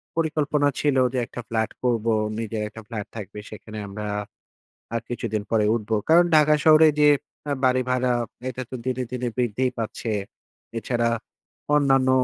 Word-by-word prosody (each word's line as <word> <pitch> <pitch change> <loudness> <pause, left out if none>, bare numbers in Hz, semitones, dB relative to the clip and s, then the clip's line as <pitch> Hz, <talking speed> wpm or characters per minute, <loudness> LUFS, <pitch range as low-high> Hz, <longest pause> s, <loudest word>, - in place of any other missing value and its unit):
পরিকল্পনা 150 -3 +1
ছিল, 145 -2 +2 0.2
যে 130 - -1
একটা 125 - -7
ফ্ল্যাট 110 -1 0
করবো। 115 -2 +1 0.3
নিজের 110 -1 -3
একটা 110 - -10
ফ্ল্যাট 110 -4 -5
থাকবে। 105 -1 -7
সেখানে 110 0 -9
আমরা 105 +1 -5 0.9
আর 115 - 0
কিছুদিন 115 -3 -2
পরেই 105 -2 +3
উঠবো। 110 -1 -1
কারণ, 175 +2 +7
ঢাকা 150 0 +6
শহরে 155 0 +8
যে 150 - +6 0.4
আ - - 0
বাড়ি 130 0 +4
ভাড়া, 125 0 +2 0.4
এটা 130 0 -5
তো - - -5
দিনে, 130 0 -1
দিনে 125 -1 -2
বৃদ্ধিই 125 +1 +1
পাচ্ছে। 115 0 -3 0.7
এছাড়া 120 0 0 0.7
অন্যান্য 135 -3 +4
125 Hz, 150 wpm, -24 LUFS, 110-135 Hz, 0.9 s, শহরে